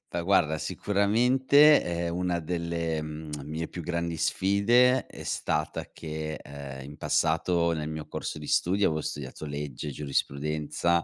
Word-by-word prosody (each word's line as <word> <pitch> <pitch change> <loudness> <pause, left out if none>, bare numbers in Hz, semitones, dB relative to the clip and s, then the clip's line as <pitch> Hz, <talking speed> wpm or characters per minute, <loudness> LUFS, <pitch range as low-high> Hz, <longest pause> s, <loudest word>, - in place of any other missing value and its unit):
Fa 85 - 0
guarda, 85 -4 +2
sicuramente, 125 - +4
ehm, 85 -1 -2
una 90 -1 0
delle, 85 -1 -2
mhmm, 75 0 -7
mie 80 +2 -4
più 90 - -7
grandi 85 0 -2
sfide 120 +10 +3
è - - -10
stata 75 0 -2
che, 80 -1 -5
uhm, 70 -1 -8
in 75 +2 -10
passato, 85 +1 +1
nel 75 -2 -2
mio 80 -1 -5
corso - - -5
di 75 - -8
studio, 95 +6 +2
avo 80 -1 -2
studiato 70 +2 -5
legge, 70 0 -5
giurisprudenza 75 +4 -1
80 Hz, 140 wpm, -28 LUFS, 75-90 Hz, -, sicuramente